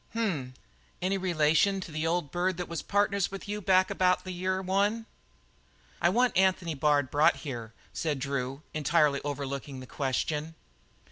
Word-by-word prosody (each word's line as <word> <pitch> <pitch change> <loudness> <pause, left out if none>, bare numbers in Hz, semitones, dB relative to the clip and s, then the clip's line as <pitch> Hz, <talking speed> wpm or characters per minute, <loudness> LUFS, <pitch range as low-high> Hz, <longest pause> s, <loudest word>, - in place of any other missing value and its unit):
"H - - -3
m! 155 - -1 0.5
Any 190 +2 0
relation 170 +1 +3
of 190 - -4
the 155 -1 -3
old 165 -4 -1
bird 180 0 0
that 180 - -4
was 170 -3 -4
partners 200 -1 +1
with 195 +1 -8
you 210 +1 -3
back 185 0 +3
about 185 0 +2
the 185 - -6
year 185 +1 -1
one?" 200 +4 0 1.0
"I 170 - +5
want 245 +5 +2
Anthony 185 -3 +2
Bard 145 -1 +2
brought 150 +2 +4
here," 120 -5 -5 0.2
said. 155 -3 -1
Drew, 135 +1 -3
entirely 150 -2 +2
overlooking 140 -1 -4
the 130 - -8
question. 150 +4 -2
170 Hz, 160 wpm, -29 LUFS, 145-190 Hz, 1.0 s, I